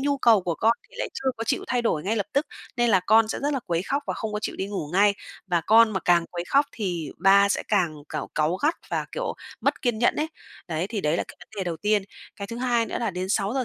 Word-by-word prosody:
nhu 280 0 0
cầu 225 -5 +5
của 170 -2 -1
con 225 +6 +3 0.2
thì - - -17
lại - - -2
chưa 270 -1 0
có 230 - -4
chịu - - -1
thay 245 -1 +1
đổi 160 -9 0
ngay 215 +6 -1
lập 205 - -1
tức, 280 +3 +1 0.3
nên 240 -1 +3
là 190 - +5
con 215 +4 +4
sẽ - - -2
rất 290 - +1
là 270 - -1
quấy 170 0 0
khóc 280 +7 -1
và - - -2
không 220 -2 -4
có 210 - -1
chịu - - -4
đi 190 - -2
ngủ 195 -7 -4
ngay, 200 +2 +4 0.3
và 175 -2 +1
con 225 +5 +6
mà 190 - -1
càng 175 -1 +3
quấy 175 -1 -4
khóc 280 +1 +4
thì 175 -8 -3
ba 200 +1 +6
sẽ - - 0
càng, 180 -7 +2
cảu - - -4
cáu 155 +4 +1
gắt 300 - +1 0.2
và, - - -1
kiểu, - - -3 0.3
mất - - 0
kiên 240 -4 0
nhẫn 240 - +3
ấy. 310 +1 -1 0.4
Đấy, 160 +2 -1
thì 215 -2 -3
đấy 150 -1 +1
là - - -1
cái - - -12
vấn - - -14
đề 195 - -2
đầu 170 -2 -3
tiên. 210 +1 +1 0.3
Cái 200 - -5
thứ 230 - -7
hai 240 -2 +1
nữa - - -3
là 230 -3 0
đến 185 +1 -4
6:00 215 +7 0
210 Hz, 280 wpm, -25 LUFS, 180-240 Hz, 0.4 s, con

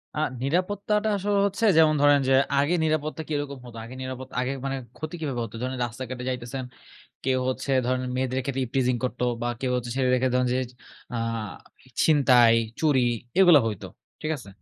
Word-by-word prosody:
আ - - -2 0.2
নিরাপত্তাটা 205 +7 0
আসলে 200 +1 0
হচ্ছে 200 +3 -1
যেমন 155 -1 +6
ধরেন 145 0 +6
যে, 135 - +4 0.3
আগে 145 +5 +2
নিরাপত্তা 155 0 -1
কিরকম 145 -2 -3
হত? 120 -2 -11
আগে 120 +3 -9
নিরাপত 130 0 -6
আগে 125 +1 -1
মানে 135 0 -2 0.2
ক্ষতি 155 +3 -5
কীভাবে 140 -6 -3
হত? 115 - -8
ধরেন 130 +1 -2
রাস্তাঘাটে 125 +1 -6
যাইতেছেন, 125 +1 -4 0.6
কেউ 130 -1 +2
হচ্ছে 130 +1 -3 0.2
ধরেন 130 0 0
মেয়েদের 130 0 -1
ক্ষেত্রে 135 0 -2
ইভটিজিং 125 0 +1
করত। 125 -1 -3 0.2
বা 120 - 0
কেউ 130 - -1
হচ্ছে 120 -1 -4
ছেলেদের 125 -1 +2
ক্ষেত্রে 130 -1 +1
ধরেন 125 0 +2
যে - - +1 0.6
আ - - -1 0.7
ই - - -18
ছিনতাই, 125 -6 +5 0.3
চুরি 140 -6 +3 0.3
এগুলা 175 -6 +8
হইতো, 105 -4 -4 0.3
ঠিক 155 - -3
আছে? 120 -7 -12
130 Hz, 175 wpm, -25 LUFS, 125-155 Hz, 0.7 s, এগুলা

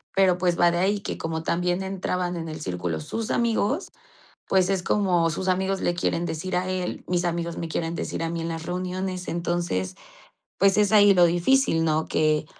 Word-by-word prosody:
Pero, 185 -2 +4
pues, 180 -1 0
va 175 - +6
de 175 - -1
ahí 200 +3 +1
que - - -4
como 160 0 -3
también 175 +2 0
entraban 180 -2 -2
en 165 -1 -5
el 155 - -7
círculo 90 -3 -3
sus 225 - -4
amigos, 235 - 0 0.6
pues 190 -1 +3
es 190 -2 0
como, 175 -4 +2
sus 185 +4 -3
amigos 190 +1 0
le 175 - 0
quieren 175 0 -1
decir 180 +3 -3
a 185 +1 -1
él, 185 -1 -3
mis 180 0 0
amigos 170 -1 -2
me 165 - -4
quieren 165 +1 -2
decir - - -4
a 165 - -1
mí 170 -1 -3
en 165 - -3
las 165 0 -5
reuniones. 185 +1 -3
Entonces, 170 - -2 0.6
pues 195 +1 +4
es 210 0 +3
ahí 205 -2 +7
lo 175 -1 +6
difícil, 175 0 +2
¿no?, 155 0 +1
que 155 -1 +1
175 Hz, 200 wpm, -25 LUFS, 165-190 Hz, 0.6 s, ahí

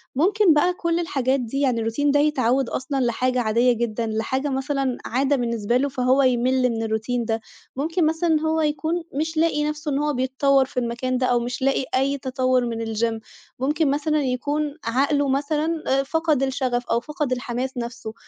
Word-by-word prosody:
ممكن 375 +3 +4
بقى 355 +5 +3
كل 340 -1 -1
الحاجات 270 -5 0
دي 250 +3 -3
يعني 240 -5 +1
الRoutine 290 +5 0
ده 290 - +3
يتعوّد 270 -3 +2
أصلًا 270 +1 -2
لحاجة 250 +2 0
عاديّة 235 +2 +3
جدًا، 235 -2 -2
لحاجة 245 +6 -1
مثلًا 270 -1 -1
عادة 270 +4 +1
بالنسبة 235 -2 0
له 280 +2 0
فهو 260 +1 +2
يمِل 255 0 +2
من 225 -1 -2
الRoutine 230 +2 -1
ده، 225 0 -1 0.3
ممكن 320 +5 0
مثلًا 320 0 +1
هو 320 0 +1
يكون 315 +3 -1
مش 315 +3 -2
لاقي 320 -2 +2
نفسه 300 0 -3
إن 275 - 0
هو 295 0 0
بيتطوّر 265 +1 +2
في 255 - -3
المكان 250 +1 -2
ده 255 - +1
أو 240 -1 +3
مش 245 +2 -4
لاقي 270 0 +1
أي 275 +2 +1
تطوّر 255 -1 0
من 230 -1 -3
الgym 225 0 -1 0.4
ممكن 295 +2 +1
مثلًا 300 +1 0
يكون 285 +3 -1
عقله 275 +4 +1
مثلًا 305 +4 -1 0.2
فقد 310 -1 0
الشغف 255 -2 -1
أو 230 - +1
فقد 295 -1 -4
الحماس 250 +1 -3
نفسه، 235 -2 -5
265 Hz, 175 wpm, -23 LUFS, 245-295 Hz, 0.4 s, ممكن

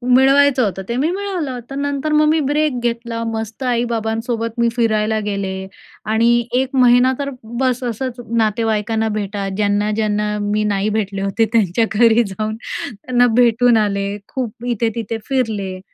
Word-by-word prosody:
मिळवायचं 270 0 +5
होतं 195 -2 -2
ते 235 - -1
मी 290 +5 +1
मिळवलं. 360 -10 -3
तर 275 - -6
नंतर 285 +1 -2
मग 305 0 +4
मी 315 - +3
ब्रेक 290 -2 0
घेतला. 235 -1 -2
मस्त 225 +3 -5
आई-बाबांसोबत 230 -1 -1
मी 235 - +3
फिरायला 220 -2 +1
गेले 195 -2 -3 0.4
आणि 235 +1 +3
1 265 +1 0
महिना 250 0 +5
तर 280 0 -2 0.3
बस 255 -1 0
असंच 245 +1 -3 0.2
नातेवाईकांना 220 0 0
भेटा. 205 -1 -3
ज्यांना-ज्यांना 210 0 0
मी 205 +1 0
नाही 205 0 0
भेटले 200 -2 -2
होते 200 +3 +1
त्यांच्या 220 0 +2
घरी 230 +1 +5
जाऊन 215 +3 -3 0.4
त्यांना 245 +3 +1
भेटून 240 0 +4
आले, 200 -1 0
खूप 240 -2 -5
इथे-तिथे 230 -1 -2
फिरले. 210 -8 -1
230 Hz, 145 wpm, -18 LUFS, 210-250 Hz, 0.4 s, मिळवायचं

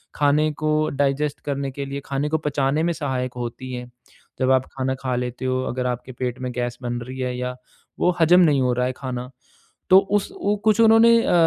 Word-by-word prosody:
खाने 150 +1 +2
को 155 0 +1
डाइजेस्ट 140 +1 0
करने 140 -1 -2
के 140 +1 -5
लिए, 140 +1 -5
खाने 140 +2 -2
को 160 - +1
पचाने 145 0 0
में 170 - +1
सहायक 130 -5 -3
होती 120 +2 -5
है। 125 0 -5 0.5
जब 130 0 +2
आप 130 -1 +3
खाना 130 0 -1
खा 130 -2 -1
लेते 125 +1 -4
हो 130 0 0
अगर 125 0 -2
आपके 125 +1 -4
पेट 125 0 -4
में 125 -1 -3
गैस 120 -1 -2
बन 120 -1 -3
रही 130 +2 -8
है 125 -1 -2
या 125 0 -3 0.4
वो - - +3
हजम 175 +3 +6
नहीं 150 -6 +4
हो 125 -1 +2
रहा 125 +1 0
है 130 - 0
खाना 125 -2 -5 0.6
तो 185 - +10 0.2
उस 200 - -4
वो 205 - +2
कुछ 215 0 +4
उन्होंने 230 +1 +6
अ, - - +1
135 Hz, 215 wpm, -22 LUFS, 125-150 Hz, 0.6 s, तो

